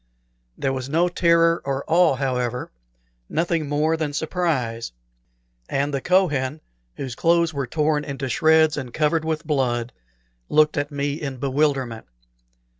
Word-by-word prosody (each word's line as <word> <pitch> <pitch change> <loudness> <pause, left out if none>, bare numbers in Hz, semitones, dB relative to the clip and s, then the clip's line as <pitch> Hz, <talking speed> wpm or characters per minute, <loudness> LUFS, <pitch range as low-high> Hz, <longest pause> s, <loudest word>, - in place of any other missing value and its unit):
There 135 -1 -1
was 130 0 -4
no 165 +4 +2
terror 170 -1 +3
or 140 0 -2
awe, 165 -3 +4
however 125 -2 -2 0.6
nothing 165 -2 -1
more 155 +2 +1
than 155 -3 -3
surprise; 140 - -2 0.8
and 140 +1 -1
the 135 - -1
Kohen, 155 -6 +1 0.4
whose 130 -3 -5
clothes 170 +3 +2
were 140 -2 -3
torn 150 +2 0
into 135 -2 -4
shreds 155 +4 +3
and 130 -4 -5
covered 155 +1 +1
with 160 -1 -2
blood, 125 -5 -1 0.6
looked 155 0 +4
at 145 -1 -1
me 145 +1 -3
in 135 -3 -4
bewilderment. 135 -3 -1
145 Hz, 135 wpm, -23 LUFS, 135-160 Hz, 0.8 s, awe